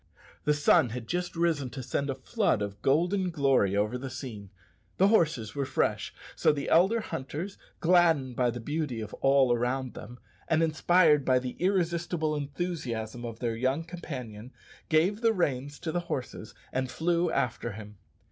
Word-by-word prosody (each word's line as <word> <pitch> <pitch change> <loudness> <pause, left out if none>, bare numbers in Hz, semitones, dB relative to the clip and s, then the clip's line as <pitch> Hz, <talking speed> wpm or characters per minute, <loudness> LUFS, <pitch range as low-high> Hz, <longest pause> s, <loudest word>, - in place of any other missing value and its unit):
The 150 - +4
sun 145 -1 +4
had 115 0 -6
just 175 +7 -3
risen 165 -6 +1
to 130 +2 -7
send 140 +3 -2
a 135 - -1
flood 135 - 0
of 100 0 -6
golden 180 +7 +2
glory 135 - +2
over 105 +5 0
the 135 +1 -5
scene, 115 -7 -7 0.5
the 195 +2 +5
horses 150 - +2
were 140 - -1
fresh, 135 - -1 0.2
so - - +4
the 145 -1 -3
elder 190 +8 +4
hunters, 160 +4 -5 0.2
gladdened 165 -7 +3
by 125 0 +2
the 120 +1 -4
beauty 145 -1 -3
of 110 - -6
all 135 -2 +4
around 125 +2 -1
them, 120 - -10 0.3
and 160 0 +2
inspired 155 -1 +4
by 130 -1 +3
the 125 0 -3
irresistible 170 -4 0
enthusiasm 135 -7 -4
of 115 -2 -6
their 115 -2 -1
young 130 +7 0
companion, 130 -10 -8 0.4
gave 180 +7 +2
the 230 -1 +3
reins 145 -6 -1
to 165 - -4
the 175 - 0
horses 125 -9 -5 0.2
and 130 0 -1
flew 170 +3 +1
after 120 -5 -1
him. 105 -2 -10
140 Hz, 165 wpm, -29 LUFS, 120-170 Hz, 0.5 s, the